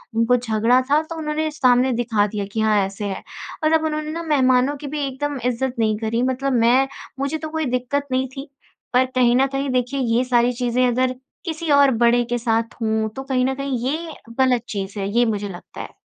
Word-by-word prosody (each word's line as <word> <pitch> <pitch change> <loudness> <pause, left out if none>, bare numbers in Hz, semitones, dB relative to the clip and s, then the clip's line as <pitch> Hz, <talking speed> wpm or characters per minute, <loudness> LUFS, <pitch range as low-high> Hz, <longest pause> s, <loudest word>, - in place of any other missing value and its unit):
उनको 230 +2 +3
झगड़ा 235 +1 +2
था 300 +1 +5
तो 330 +1 -8
उन्होंने 310 0 -2
सामने 255 -3 +3
दिखा 230 -3 +1
दिया 205 -1 -4
कि 220 +1 -1
हाँ 215 -1 +3
ऐसे 195 +2 -6
है। 190 - -5 0.4
और 310 +1 +3
अब 320 - +3
उन्होंने 305 0 -2
ना 335 +1 -4
मेहमानों 265 -2 +3
की 285 +1 -8
भी 290 -1 -1
एकदम 285 +1 -3
इज़्ज़त 250 +1 0
नहीं 215 -2 +2
करी, 225 +1 -1
मतलब 260 +1 0
मैं 245 +3 +4 0.3
मुझे 280 +3 -1
तो 315 0 -6
कोई 315 0 -2
दिक्कत 280 +3 -2
नहीं 260 +1 +1
थी। 275 +2 -7 0.4
पर 255 +1 +4
कहीं 245 -1 +4
न 265 - +4
कहीं 275 +1 -2
देखिए 255 +2 -1
ये 240 0 +1
सारी 245 -1 +3
चीज़ें 245 +1 +1
अगर 255 +1 +1 0.3
किसी 325 -1 -4
और 280 -1 +6
बड़े 240 0 +3
के 240 - 0
साथ 230 -1 0
हों 220 0 0
तो 270 - -5
कहीं 260 -2 0
न 265 - 0
कहीं 275 -1 -2
ये 320 +3 -3 0.3
ग़लत 255 -3 +3
चीज़ 200 0 -4
है, 195 - -2
ये 240 +2 +3
मुझे 205 -3 -2
लगता 175 -1 -9
है। - - -9
255 Hz, 215 wpm, -21 LUFS, 230-280 Hz, 0.4 s, और